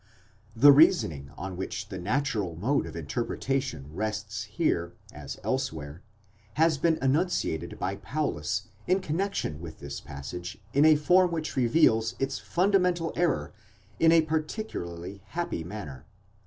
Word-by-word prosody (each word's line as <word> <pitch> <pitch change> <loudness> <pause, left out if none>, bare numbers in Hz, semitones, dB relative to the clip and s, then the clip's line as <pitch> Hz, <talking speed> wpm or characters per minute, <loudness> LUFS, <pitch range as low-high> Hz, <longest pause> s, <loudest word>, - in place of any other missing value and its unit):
® - - -35 0.6
The 145 +3 +10
reasoning 110 - +4
on 95 -1 -5
which 100 +3 -5
the 95 -3 -5
natural 105 - -1
mode 120 - 0
of 80 - -9
interpretation 85 - -2
rests 105 +1 -3
here, 105 - -1 0.2
as - - -7
elsewhere, 80 - -3 0.5
has 160 -2 +3
been 165 +1 +3
enunciated 135 - 0
by 95 +2 -2
Paulus 100 - -2 0.2
in 185 +2 +3
connexion 175 - -2
with 80 -2 -8
this 70 0 -6
passage 80 +7 -7 0.2
in 140 +2 +5
a 155 -1 +8
form 180 +5 +4
which 160 -2 -3
reveals 115 -3 +3
its 135 +1 -2
fundamental 180 -3 +1
error 175 -9 0 0.5
in 165 - +6
a 165 -1 +6
particularly 155 - -4
happy 170 - -3
manner. 80 -8 -8
115 Hz, 135 wpm, -28 LUFS, -, 0.6 s, The